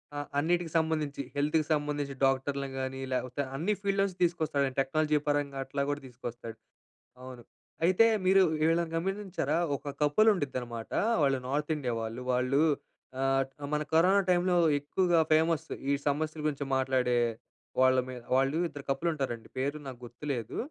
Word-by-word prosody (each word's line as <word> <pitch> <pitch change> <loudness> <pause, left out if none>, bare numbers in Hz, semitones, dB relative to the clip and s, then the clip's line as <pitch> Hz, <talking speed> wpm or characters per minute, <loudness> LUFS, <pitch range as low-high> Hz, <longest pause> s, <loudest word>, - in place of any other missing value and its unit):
ఆ! - - -4 0.2
అన్నిటికి 170 +2 0
సంబంధించి 155 -3 -1
హెల్త్‌కి 150 +2 +1
సంబంధించి 145 -2 -2
డాక్టర్‌లని 135 +1 0
గాని, 130 0 -4
లేపోతే 125 +2 -2
అన్ని 170 +9 0
ఫీల్డ్‌లో 195 -1 +1
నుంచి 185 -2 -6
తీసుకొస్తాడు. 155 -5 +1
టెక్నాలజీ 150 +3 +2
పరంగా 145 -1 0
అట్లా 140 +1 -3
గూడా 145 0 -2
తీసుకొస్తాడు. 120 -2 -8 0.7
అవును. 130 -2 -9 0.4
అయితే 185 +6 +5 0.2
మీరు 190 +1 +6 0.2
వీళ్ళని 165 +1 +2
గమనించారా 190 -4 -1 0.2
ఒక 145 - -7
కపుల్ 150 +10 +4
ఉండుంద్దనమాట, 125 - -4 0.3
వాళ్ళు 135 -2 +3
నార్త్ 150 +3 -1
ఇండియా 125 -5 -2
వాళ్ళు. 115 +2 -5
వాళ్ళు 125 +3 +2 0.6
ఆహ్, 135 0 +2 0.3
మన 150 0 +1
కరోనా 185 +5 +5
టైమ్‌లో 180 0 +3 0.2
ఎక్కువగా 170 +4 +1
ఫేమస్. 160 0 +3 0.2
ఈ - - +4 0.2
సమస్యల 155 +2 -2
గురించి 145 -1 -1
మాట్లాడే 130 -2 +1 0.6
వాళ్ళమి 130 0 +3 0.2
వాళ్ళు 135 +3 +2
ఇద్దరు 145 -3 -10
కపుల్ 135 +5 0
ఉంటారండి. 130 -6 -4
పేర్లు 140 +3 -2
నాకు 130 -2 -7
గుర్తులేదు. 120 -1 -5
145 Hz, 140 wpm, -30 LUFS, 130-160 Hz, 0.7 s, మీరు